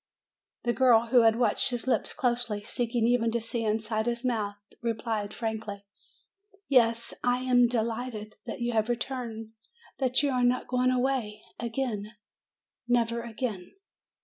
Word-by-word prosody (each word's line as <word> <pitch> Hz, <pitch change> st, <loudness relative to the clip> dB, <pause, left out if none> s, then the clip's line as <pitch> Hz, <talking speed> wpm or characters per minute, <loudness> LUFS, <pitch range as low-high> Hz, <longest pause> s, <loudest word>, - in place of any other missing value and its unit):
The 240 Hz, -, +1 dB
girl, 235 Hz, -3 st, +4 dB
who 250 Hz, -2 st, +7 dB
had 225 Hz, -1 st, +5 dB
watched 235 Hz, -3 st, +3 dB
his 245 Hz, -2 st, -3 dB
lips 260 Hz, -, +1 dB
closely, 240 Hz, -5 st, -1 dB
seeking 235 Hz, +1 st, -1 dB
even 235 Hz, -1 st, +3 dB
to 235 Hz, -, +1 dB
see 230 Hz, +1 st, -3 dB
inside 220 Hz, +1 st, -1 dB
his 240 Hz, +1 st, -2 dB
mouth, 215 Hz, -5 st, -1 dB, 0.3 s
replied 225 Hz, -3 st, -2 dB
frankly: 215 Hz, -3 st, -4 dB, 0.8 s
"Yes, 235 Hz, -3 st, +3 dB
I 245 Hz, +1 st, +1 dB
am 245 Hz, -1 st, +5 dB
de 235 Hz, -2 st, +1 dB
light 235 Hz, +1 st, -4 dB
ed 215 Hz, 0 st, -8 dB
that 230 Hz, -, -5 dB
you 240 Hz, 0 st, 0 dB
have 220 Hz, 0 st, +1 dB
returned, 235 Hz, -2 st, -3 dB, 0.5 s
that 260 Hz, +1 st, +3 dB
you 285 Hz, -, +2 dB
are 250 Hz, -1 st, +1 dB
not 245 Hz, +1 st, +2 dB
go 250 Hz, 0 st, 0 dB
ing 255 Hz, -, +4 dB
a 255 Hz, -, +2 dB
way 245 Hz, -5 st, -1 dB, 0.2 s
a 235 Hz, -, -3 dB
gain 225 Hz, -4 st, -3 dB, 0.7 s
nev 240 Hz, -1 st, +2 dB
er 235 Hz, -, -2 dB
a 235 Hz, 0 st, -8 dB
gain." 215 Hz, -6 st, -4 dB
235 Hz, 175 wpm, -28 LUFS, 220-245 Hz, 0.8 s, who